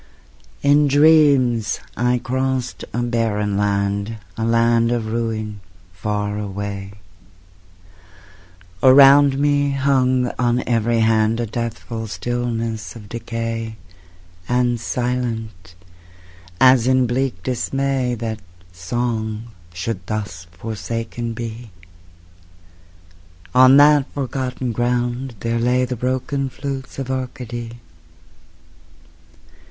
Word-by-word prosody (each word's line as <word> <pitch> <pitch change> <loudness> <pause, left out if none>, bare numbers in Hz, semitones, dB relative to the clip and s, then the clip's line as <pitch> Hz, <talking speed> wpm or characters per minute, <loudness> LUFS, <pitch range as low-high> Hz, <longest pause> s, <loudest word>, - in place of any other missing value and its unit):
In 145 +1 +5
dreams 140 -6 +4 0.2
I 125 +1 +1
crossed 130 0 -2
a 120 - -1
barren 110 -4 0
land, 100 +1 -1 0.2
A 115 - -3
land 115 0 +3
of 120 -2 -1
ruin, 110 -2 -3 0.3
far 105 +2 -2
away; 100 -1 -5 1.9
Around 135 +1 +7
me 145 0 +2
hung 130 -2 +2
on 120 0 +1
every 115 -1 +1
hand 110 0 +2
A 120 - 0
deathful 115 0 -5
stillness 115 -1 -3
of 105 -3 -11
decay; 115 -1 -4 0.7
And 125 -1 +1
silent, 115 -8 -3 0.8
as 130 -2 +6
in 130 -1 +4
bleak 120 -6 -2
dismay 130 0 -1
That 110 -1 -4 0.3
song 110 +4 -3 0.2
should 90 +1 -5
thus 100 -6 -4
forsaken 115 +4 -5
be, 115 0 -7 1.8
On 130 +1 +7
that 145 -1 +5
forgotten 130 -2 -3
ground 120 +1 -1
there 115 0 -1
lay 125 +2 +2
The 125 0 -4
broken 130 +3 -2
flutes 135 0 -6
of 135 -1 -4
Arcady. 120 -2 -5
120 Hz, 95 wpm, -20 LUFS, 110-130 Hz, 1.9 s, Around